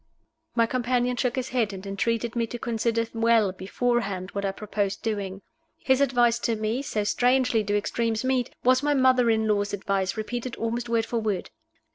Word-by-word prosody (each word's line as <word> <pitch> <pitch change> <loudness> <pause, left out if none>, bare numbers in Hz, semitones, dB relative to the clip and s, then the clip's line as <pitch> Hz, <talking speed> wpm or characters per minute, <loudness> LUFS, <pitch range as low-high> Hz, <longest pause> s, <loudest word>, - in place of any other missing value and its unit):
My 230 -1 +4
companion 250 +1 0
shook 245 0 0
his 260 0 -2
head, 230 -5 0
and 190 0 -8
entreated 230 +4 -1
me 230 -1 0
to 240 - -6
consider 230 0 0
well 225 -3 +3
beforehand 195 0 -2
what 200 - -3
I 195 - 0
proposed 205 0 -3
doing. 200 -3 -3 0.3
His 265 0 +2
advice 240 -3 +3
to 230 -1 0
me 220 +4 -1
so 215 -6 -2
strangely 245 +1 +2
do 205 0 0
extremes 225 +2 -1
meet! 255 -2 +1
was 255 +1 +4
my 290 0 +1
mother 255 -2 +4
in 220 -1 +2
law's 205 -1 0
advice, 195 -1 -1
repeated 240 +3 -4
almost 235 +1 -3
word 230 -1 +1
for 235 0 -2
word. 210 -5 -2
230 Hz, 180 wpm, -26 LUFS, 205-245 Hz, 0.3 s, My